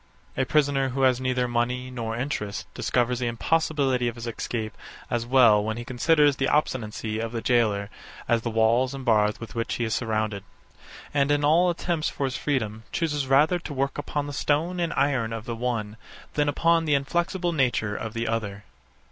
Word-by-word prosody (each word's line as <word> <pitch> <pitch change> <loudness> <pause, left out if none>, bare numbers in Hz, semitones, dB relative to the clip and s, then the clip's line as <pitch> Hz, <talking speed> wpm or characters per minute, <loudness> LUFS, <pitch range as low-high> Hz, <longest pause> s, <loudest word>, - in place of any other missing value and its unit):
A 130 - +1
prisoner 140 -3 +2
who 135 +1 -1
has 130 -1 +3
neither 130 -1 0
money 125 +2 -1
nor 115 -3 -4
interest, 105 -6 -3
discovers 125 0 0
the 125 - -1
impossibility 135 0 +1
of 120 - -3
his 120 0 -7
escape, 115 -1 -4 0.4
as 120 -1 -1
well 120 -5 +5
when 110 +1 -3
he 120 - -6
considers 145 +2 +3
the 135 - +1
obstinacy 110 -7 -1
of 115 0 -3
the 115 - -2
gaoler, 105 -5 +1 0.4
as 115 -1 +2
the 115 - -2
walls 115 +4 +2
and 135 -1 -7
bars 105 -2 +3
with 115 -2 -8
which 115 -1 -2
he 120 - -2
is 110 -2 -1
surrounded; 110 -3 -1 0.7
and, 140 -1 +2
in 145 0 +2
all 170 +4 +4
attempts 170 -2 -1
for 140 - -3
his 130 -1 -3
freedom, 110 -7 -2
chooses 150 -5 -1
rather 150 +6 +4
to 155 -4 -7
work 135 +1 -1
upon 145 -1 -2
the 145 - -6
stone 160 +6 0
and 170 -1 0
iron 135 -5 +1
of 115 -1 -5
the 120 -2 -4
one, 115 -3 -3 0.4
than 145 -1 +1
upon 165 +3 +2
the 150 -2 +3
inflexible 175 +5 0
nature 120 -7 +1
of 110 +1 -5
the 115 +1 -2
other. 105 -3 -3
125 Hz, 190 wpm, -25 LUFS, 115-145 Hz, 0.7 s, well